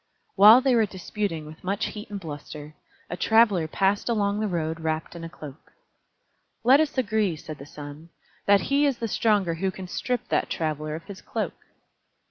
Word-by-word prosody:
While 215 +5 +9
they 265 -1 +2
were 225 -3 +3
disputing 190 -3 -4
with 155 +1 -12
much 200 +3 -1
heat 210 -1 -8
and 205 -1 -5
bluster, 150 -2 -8 0.3
a 175 - -4
Traveler 205 -3 +3
passed 195 +7 0
along 205 -2 +1
the 215 - 0
road 165 -3 -2
wrapped 160 +1 -3
in 170 - -8
a 165 - -6
cloak. 150 -2 -12 0.9
"Let 260 +4 +6
us 310 -3 0
agree," 215 -7 +1
said 155 0 -9
the 140 - -10
Sun, 145 +3 -10 0.4
"that 200 0 +5
he 285 +1 +2
is 270 -4 0
the 230 - -3
stronger 205 -5 +1
who 190 +4 -1
can 185 0 -8
strip 245 +6 -3
that - - 0
Traveler 155 -1 -2
of 165 - -8
his 195 +2 -10
cloak." - - -3
190 Hz, 185 wpm, -25 LUFS, 160-215 Hz, 0.9 s, While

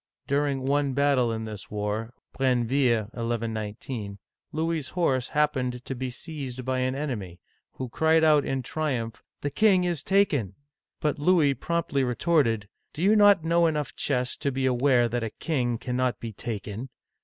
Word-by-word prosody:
During 140 -1 0
one 140 0 +1
battle 135 -3 +2
in 110 0 -3
this 105 -2 -8
war 105 +3 -3 0.2
(Brenneville, 125 -3 +2
1 115 -1 -3
1 115 0 -3
19), 105 -1 -5 0.3
Louisas 160 -2 -2
horse 135 -8 +1
happened 130 -5 0
to - - -3
be 130 0 -4
seized 130 -2 -6
by 130 0 0
an 130 +1 0
enemy, 105 - -4 0.3
who 130 - -5
cried 160 +6 +3
out 150 -2 +5
in 135 -1 -2
triumph, 120 -6 -3 0.2
The 145 - -2
king 190 +2 +4
is 175 -5 -1
taken! 145 - +1 0.5
But 150 -1 0
Louis 150 -3 +4
promptly 145 0 -1
retorted, 125 - +1
" - - -50
Do 160 - -3
you 205 +3 +5
not 205 -5 +6
know 170 +1 +3
enough 150 -2 -2
chess 125 -3 0
to 140 - -1
be 130 0 -1
aware 125 -1 +3
that 120 +1 -2
a 115 - -2
king 125 -7 0
cannot 125 +1 -1
be 115 -2 -6
taken 110 +3 -5
130 Hz, 165 wpm, -26 LUFS, 120-150 Hz, 0.5 s, not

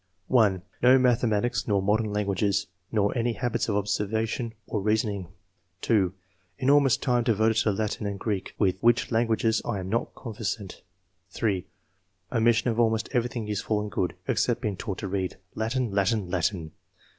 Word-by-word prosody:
(1) 100 -7 +3 0.2
"No 125 +2 +7
mathematics 120 -3 +1
nor 100 -2 +2
modern 105 +2 +1
languages, 100 -1 0 0.3
nor 105 0 +1
any 120 0 +1
habits 120 -1 -1
of 100 - +1
observation 110 +3 -1
or 105 - -2
reasoning." 105 -3 0 0.5
(2) 100 -6 +2 0.3
" 90 -1 -42
Enormous 135 +1 +4
time 125 -3 +1
devoted 110 -1 +2
to 110 -1 +2
Latin 105 +1 -2
and 100 -1 -4
Greek, 100 -3 -3
with 95 -3 +1
which 120 +1 +3
languages 115 -1 +2
I 115 - -2
am 95 0 -5
not 115 +3 -1
conversant." 110 -4 -5 0.5
(3) 95 -1 -1 0.3
" 90 0 -44
Omission 115 0 +3
of 115 - -2
almost 110 -1 +2
everything 120 -2 -1
useful 105 +1 -1
and 105 0 -4
good, 90 -3 -1
except 120 0 +1
being 105 -5 -1
taught 95 +1 -5
to 100 - -4
read. 95 -1 -2 0.2
Latin! 115 +1 -1
Latin 100 +2 +2
1 90 - -9
Latin 90 -3 -1
110 Hz, 165 wpm, -27 LUFS, 100-115 Hz, 0.5 s, No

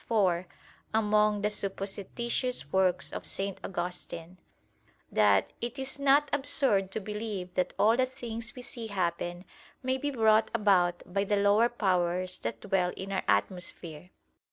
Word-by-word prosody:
4: 185 -6 +2 0.5
among 210 -1 +3
the 210 - +2
supposititious 200 - -3
works 190 -1 +2
of - - -5
St. 195 0 -3
Augustine] 175 -1 -5 0.7
that 100 -2 +3
"it 240 +2 -4
is 270 +1 -3
not 280 +1 +4
absurd 265 -8 +2
to 205 - -3
believe 210 -3 -5
that 180 -1 -1
all 220 +2 +5
the 255 +1 +2
things 235 -1 -7
we 250 - -8
see 235 -2 -6
happen 175 -2 -2 0.4
may 260 +1 0
be 290 - -1
brought 220 -4 +4
about 180 -4 +3
by 195 0 +2
the 205 +1 +1
lower 205 +4 +4
powers 185 -4 0
that - - -4
dwell 190 -3 +1
in 190 +1 -6
our 190 - 0
atmosphere." 170 - -2
200 Hz, 145 wpm, -29 LUFS, 180-230 Hz, 0.7 s, all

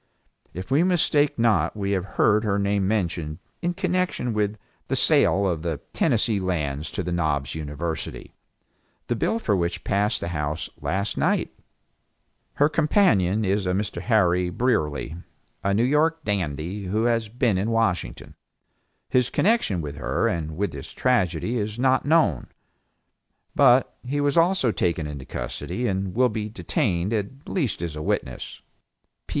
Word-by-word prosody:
If 90 +9 -8
we 140 +4 +4
mistake 155 -5 +2
not 115 -2 +2
we 100 -1 -1
have 95 -2 0
heard 105 +1 +4
her 100 -2 +1
name 100 -1 +1
mentioned 85 -7 -1 0.2
in 175 0 -1
connection 185 - -1
with 105 0 0 0.3
the - - 0
sale 100 - +4
of 85 -5 0
the 80 -4 -3
Tennessee 110 -2 +2
Lands 75 -6 -2
to 95 - -2
the 90 - -3
Knobs 75 -5 0
University, 80 +1 -5 0.7
the 120 - -1
bill 225 - 0
for 105 - 0
which 85 -1 -2
passed 105 +3 +1
the 85 - -4
House 75 -1 -3
last 100 +2 -2
night. - - +1 1.0
Her 145 - +3
companion 150 - +2
is 95 0 0
Mr. 95 0 -1
Harry 90 -5 +2
Brierly, 85 - -1 0.5
a 100 - +1
New 105 +4 +2
York 155 +5 +2
dandy, 95 - -2
who 105 +5 0
has 115 -2 +1
been 115 -4 +1
in 105 +4 -1
Washington. 110 - -1 0.7
His 125 -2 +2
connection 200 - +1
with 70 -2 -6
her - - 0
and 80 -1 -3
with 100 -2 -1
this 70 -2 -9
tragedy 115 -2 +1
is 105 +1 -3
not 130 +1 +2
known, 155 - +3 1.1
but 130 -2 +4
he 135 +3 -2
was 145 -1 +1
also 170 -7 +3
taken 85 -5 0
into 70 -3 -6
custody, 65 - -4
and 95 -3 -2
will 125 +1 +4
be 110 -1 -4
detained 105 - -1
at 110 +6 -4
least 135 - -1
as 80 -3 -4
a 75 - -5
witness. 65 -4 -3
100 Hz, 150 wpm, -24 LUFS, 85-125 Hz, 1.1 s, we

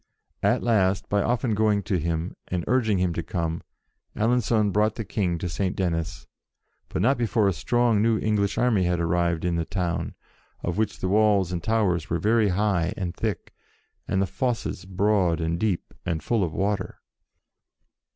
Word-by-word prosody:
At - - +2
last, 100 -5 +2
by 100 0 +2
often 120 +1 0
going 105 -1 +2
to 95 -5 0
him, 80 +2 -2
and 90 -2 -2
urging 110 -4 +2
him 90 -1 +1
to 85 - -2
come, 85 -1 -3 0.5
Alencon 110 -2 +2
brought 105 +2 +2
the 115 - -5
King 90 -3 -1
to 90 - -3
Saint 90 +3 -2
Denis, 85 -2 -2 0.6
but 90 - -1
not 130 +3 +3
before 110 -3 +2
a 95 - +2
strong 120 +2 +2
new 115 0 +3
English 105 -2 0
army 110 -7 +2
had 90 -1 +1
arrived 85 0 0
in 85 -1 0
the 85 - 0
town, 85 0 -2 0.5
of 85 +3 -2
which 110 -2 -1
the - - 0
walls 100 -2 +3
and 85 -2 -2
towers 100 -7 0
were 85 - +1
very 110 +3 +3
high 95 -1 +1
and 90 -3 -3
thick, 105 -6 -3 0.5
and 95 - 0
the 95 - +2
fosses 115 -4 -2
broad 95 -2 +1
and 85 +1 -1
deep, 100 -4 -1
and 80 -4 -2
full 115 +1 +1
of 85 - -1
water. 95 +2 -2
95 Hz, 175 wpm, -25 LUFS, 85-110 Hz, 0.6 s, not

